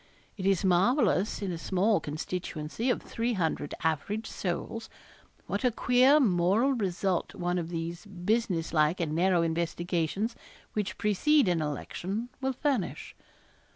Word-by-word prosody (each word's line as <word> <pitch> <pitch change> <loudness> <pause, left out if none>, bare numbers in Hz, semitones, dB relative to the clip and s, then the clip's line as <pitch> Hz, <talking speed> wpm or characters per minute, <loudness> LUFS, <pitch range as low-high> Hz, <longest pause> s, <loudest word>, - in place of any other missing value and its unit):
It 190 -2 -2
is 195 -1 +2
marvellous 200 +2 +2
in 190 - -1
a 170 - -4
small 195 +5 +2
constituency 160 - -4
of - - 0
300 190 -11 -1
average 165 +8 -1
souls, 200 +5 -4 0.6
what - - -3
a 250 - +5
queer 250 +5 +4
moral 205 - +3
result 190 -5 -1
one 175 0 -1
of 165 -1 -4
these 170 +2 -5
business 190 -2 -1
like 155 +3 +3
and 160 -3 -1
narrow 175 +1 +3
investigations 170 +5 -1 0.4
which 210 -2 -2
precede 245 +6 +3
an 175 -3 +2
election 190 - -4
will 265 0 0
furnish. 255 - -2
185 Hz, 130 wpm, -29 LUFS, 170-225 Hz, 0.6 s, a